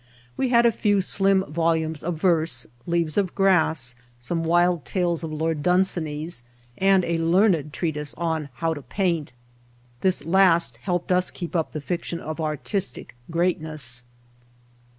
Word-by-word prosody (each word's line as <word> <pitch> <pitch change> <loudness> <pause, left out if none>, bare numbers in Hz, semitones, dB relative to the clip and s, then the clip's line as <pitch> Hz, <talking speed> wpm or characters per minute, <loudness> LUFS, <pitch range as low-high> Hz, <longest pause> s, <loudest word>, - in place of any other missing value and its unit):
We 260 - 0
had 235 -1 +5
a 235 - +6
few 205 -2 +2
slim 195 0 +2
volumes 160 0 0
of 175 0 -2
verse, 160 -8 +2 0.2
"Leaves 170 -1 +1
of 190 -3 -2
Grass," 160 - +2 0.3
some 165 +8 -2
w^ild 175 0 +2
tales 175 -3 -1
of 160 - -4
Lord 155 0 -1
Dunsany's 170 -5 0 0.4
and 195 -1 +4
a 170 -1 0
learned 165 -2 +3
treatise 150 -2 -3
on 160 -3 -2
how 165 +6 0
to 145 - -7
paint. 170 - -1 0.7
This 185 +5 0
last 170 -7 +3
helped 175 - -2
us 180 0 +3
to - - -8
keep 175 -1 -6
up 165 -2 0
the 155 - -5
fiction 170 +1 -3
of 155 +1 -5
artistic 155 - -3
greatness. 155 -7 -2
165 Hz, 150 wpm, -24 LUFS, 155-185 Hz, 0.7 s, a